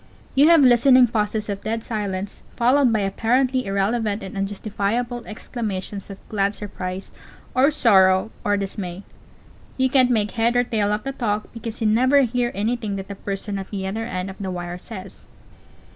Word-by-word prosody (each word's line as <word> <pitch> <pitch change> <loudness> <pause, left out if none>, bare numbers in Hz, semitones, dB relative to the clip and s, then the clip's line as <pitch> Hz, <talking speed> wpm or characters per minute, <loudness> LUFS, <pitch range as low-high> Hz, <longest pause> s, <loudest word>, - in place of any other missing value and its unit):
You 280 +3 +5
have 335 -3 +7
listening 255 0 +6
pauses 215 -2 -1
of 200 -1 -4
dead 225 +1 -3
silence, 200 -3 -4
followed 250 +1 +4
by 220 -2 +1
apparently 250 +5 +1
irrelevant 205 +2 0
and 190 - -8
unjustifiable 210 +4 -2
exclamations 210 -3 -5
of 195 - -8
glad 200 -1 0
surprise 190 -2 -6 0.4
or 265 +3 +4
sorrow 195 -7 +4
or 205 0 +2
dismay. 195 -2 -5 0.7
You 260 -1 +2
can't 255 -2 +5
make 215 -4 +1
head 235 +1 +1
or 245 - +4
tail 215 -4 0
of 210 0 -1
the 275 - -3
talk, 215 -5 -2
because 230 0 -7
you 220 - +2
never 255 +6 +4
hear 245 0 0
anything 215 0 -1
that 195 0 -6
the - - -4
person 200 0 -4
at 190 - -7
the 195 -2 -4
other 220 +4 -3
end 185 -3 -4
of 190 - -14
the 195 -2 -4
wire 175 -1 -5
says. 195 -2 -10
215 Hz, 175 wpm, -22 LUFS, 195-240 Hz, 0.7 s, have